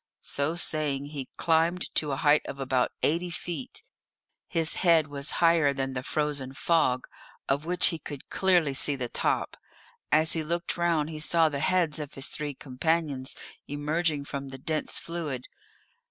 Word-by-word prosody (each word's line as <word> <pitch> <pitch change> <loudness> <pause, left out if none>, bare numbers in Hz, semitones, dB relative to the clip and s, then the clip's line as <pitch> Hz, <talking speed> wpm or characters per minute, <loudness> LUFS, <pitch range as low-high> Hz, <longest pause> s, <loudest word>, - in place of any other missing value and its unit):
So 145 +4 0
saying 150 -4 0
he 145 -3 -6
climbed 165 +2 +1
to 150 -2 +1
a - - 0
height 145 +1 +4
of 140 - -6
about 130 -2 +1
eighty 170 +4 +1
feet; 170 -5 -5 0.6
his 165 -1 0
head 165 -4 +5
was 145 0 -3
higher 165 -4 +4
than 135 -1 -2
the 125 - -2
frozen 140 -1 -2
fog, 135 -6 +2 0.4
of 140 +4 0
which 180 0 +4
he 165 -3 -4
could 145 -2 -8
clearly 175 -7 +3
see 140 +1 +1
the 125 -3 -4
top. - - 0 0.5
As 155 +1 +4
he 160 - 0
looked 170 +3 -1
round 165 -3 +1
he 155 - -6
saw 160 +1 +3
the 140 -2 -3
heads 170 -1 +2
of 150 -2 -6
his 135 - +1
three 145 -2 -3
companions 140 0 -1 0.3
emerging 150 +1 -1
from 140 -1 -5
the 135 0 -8
dense 155 +3 -1
fluid. 155 -7 -4
150 Hz, 165 wpm, -28 LUFS, 140-165 Hz, 0.6 s, head